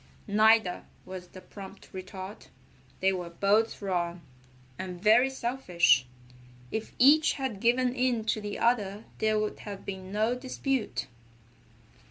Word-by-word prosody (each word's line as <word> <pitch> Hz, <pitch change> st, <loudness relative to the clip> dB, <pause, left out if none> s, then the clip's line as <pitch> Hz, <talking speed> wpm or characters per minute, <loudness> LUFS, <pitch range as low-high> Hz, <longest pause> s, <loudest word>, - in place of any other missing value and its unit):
"Neither," 215 Hz, -2 st, +3 dB, 0.2 s
was 185 Hz, -1 st, -8 dB
the 185 Hz, -, -12 dB
prompt 195 Hz, +1 st, -11 dB
retort. 190 Hz, +1 st, -8 dB, 0.5 s
"They 190 Hz, 0 st, +3 dB
were 180 Hz, -2 st, -4 dB
both 205 Hz, +5 st, +1 dB
wrong, 175 Hz, -2 st, -1 dB, 0.6 s
and 185 Hz, -1 st, -5 dB
very 225 Hz, +7 st, +5 dB
selfish. 235 Hz, -, +2 dB, 0.6 s
If 220 Hz, -, -4 dB
each 300 Hz, +5 st, +6 dB
had 265 Hz, -8 st, -3 dB
given 245 Hz, +3 st, +2 dB
in 250 Hz, -3 st, +1 dB
to 220 Hz, 0 st, 0 dB
the 205 Hz, 0 st, -4 dB
other 215 Hz, -3 st, +1 dB, 0.2 s
there 215 Hz, 0 st, +2 dB
would 215 Hz, 0 st, -2 dB
have 200 Hz, -2 st, -8 dB
been 190 Hz, -1 st, -6 dB
no 215 Hz, +3 st, +1 dB
dispute." 260 Hz, -1 st, -2 dB
210 Hz, 130 wpm, -29 LUFS, 190-240 Hz, 0.6 s, each